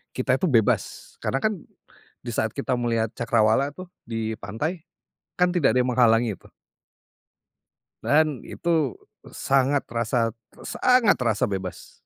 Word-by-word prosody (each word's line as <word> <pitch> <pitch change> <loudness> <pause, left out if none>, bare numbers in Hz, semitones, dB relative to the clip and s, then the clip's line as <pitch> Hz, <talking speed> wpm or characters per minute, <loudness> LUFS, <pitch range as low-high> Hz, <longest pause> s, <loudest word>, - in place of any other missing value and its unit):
kita 130 0 +1
itu - - +1
bebas, 115 -6 0
karena, 135 - 0
kan, 215 0 +2 0.7
di 120 - -5
saat 110 0 0
kita 125 - -1
melihat 115 -2 0
cakrawala, 120 +2 +2
tuh, 185 0 -9 0.2
di 115 -1 -3
pantai, 150 - -4 0.6
kan, 180 0 +4
tidak 170 -7 +3
ada 125 - +3
yang 125 - -1
menghalangi 120 -1 +4
itu. - - -19 1.6
Dan 150 -3 +2
itu. 160 -8 0 0.4
Sangat 135 +1 +2
rasa 115 0 0 0.3
sangat 250 -4 +3
rasa 115 -4 0
bebas. 95 -2 -4
125 Hz, 130 wpm, -24 LUFS, 115-145 Hz, 1.6 s, kan